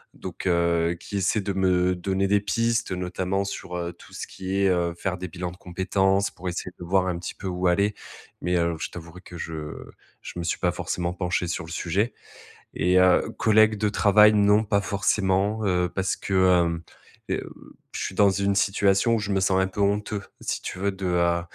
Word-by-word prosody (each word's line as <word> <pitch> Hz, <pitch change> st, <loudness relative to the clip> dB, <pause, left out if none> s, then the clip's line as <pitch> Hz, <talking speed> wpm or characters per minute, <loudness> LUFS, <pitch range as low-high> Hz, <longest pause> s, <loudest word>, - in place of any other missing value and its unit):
donc, -, -, -6 dB
heu, 85 Hz, -1 st, +2 dB
qui 100 Hz, -, -5 dB
essaie 100 Hz, +3 st, +1 dB
de 100 Hz, 0 st, -3 dB
me 90 Hz, -1 st, +2 dB
donner 95 Hz, +2 st, -1 dB
des 100 Hz, +1 st, +3 dB
pistes. 115 Hz, +1 st, 0 dB
Notamment 95 Hz, +2 st, -2 dB
sur, 90 Hz, -2 st, -5 dB
heu, 85 Hz, 0 st, -4 dB
tout -, -, -17 dB
ce -, -, -5 dB
qui 95 Hz, 0 st, -5 dB
est, 95 Hz, -, +4 dB
heu, 85 Hz, -2 st, 0 dB
faire 95 Hz, 0 st, -2 dB
des 90 Hz, -, -4 dB
bilans 90 Hz, 0 st, -5 dB
de 90 Hz, -, -14 dB
compétences 95 Hz, +2 st, 0 dB
pour 90 Hz, 0 st, -6 dB
essayer 90 Hz, +1 st, -5 dB
de -, -, -7 dB
voir 95 Hz, +1 st, +2 dB
un 90 Hz, -2 st, -2 dB
petit 90 Hz, -, -6 dB
peu -, -, -11 dB
où 90 Hz, 0 st, -1 dB
aller. 100 Hz, +4 st, +2 dB, 0.5 s
Mais, 90 Hz, 0 st, +1 dB
alo 85 Hz, -1 st, 0 dB
je -, -, -3 dB
t'avouerai 85 Hz, +1 st, -10 dB
que 90 Hz, -2 st, -11 dB
je 80 Hz, -2 st, -6 dB, 0.5 s
je -, -, -8 dB
me 85 Hz, -, -3 dB
suis 85 Hz, -, -1 dB
pas 90 Hz, -, +1 dB
forcément 90 Hz, 0 st, -3 dB
penché 90 Hz, 0 st, -1 dB
sur 85 Hz, 0 st, -3 dB
le 80 Hz, -, -10 dB
sujet. 95 Hz, +7 st, -1 dB, 0.6 s
Et 90 Hz, +3 st, +3 dB
heu, 90 Hz, -1 st, +4 dB
collègue 110 Hz, 0 st, +4 dB
de 105 Hz, -, +1 dB
travail, 105 Hz, +1 st, +5 dB
non, 105 Hz, +1 st, +4 dB
pas 100 Hz, -1 st, +1 dB
forcément, 100 Hz, +1 st, 0 dB
heu, 90 Hz, -2 st, +1 dB
parce 95 Hz, +1 st, -1 dB
que 100 Hz, -, -5 dB, 0.3 s
hem, 85 Hz, 0 st, -3 dB, 0.5 s
heu, -, -, -2 dB, 0.4 s
je -, -, -4 dB
suis -, -, -3 dB
dans 100 Hz, +1 st, +5 dB
une 100 Hz, +1 st, 0 dB
situation 100 Hz, +3 st, +3 dB
où -, -, 0 dB
je 105 Hz, -1 st, -3 dB
me 95 Hz, -, +2 dB
sens 95 Hz, 0 st, +2 dB
un 95 Hz, -, +1 dB
peu 95 Hz, -, -9 dB
honteux, 100 Hz, +1 st, 0 dB, 0.2 s
si -, -, -3 dB
tu 90 Hz, -, -6 dB
veux, 100 Hz, +1 st, 0 dB
de, 95 Hz, 0 st, -6 dB
heu, 85 Hz, -1 st, +2 dB
95 Hz, 210 wpm, -25 LUFS, 90-100 Hz, 0.6 s, travail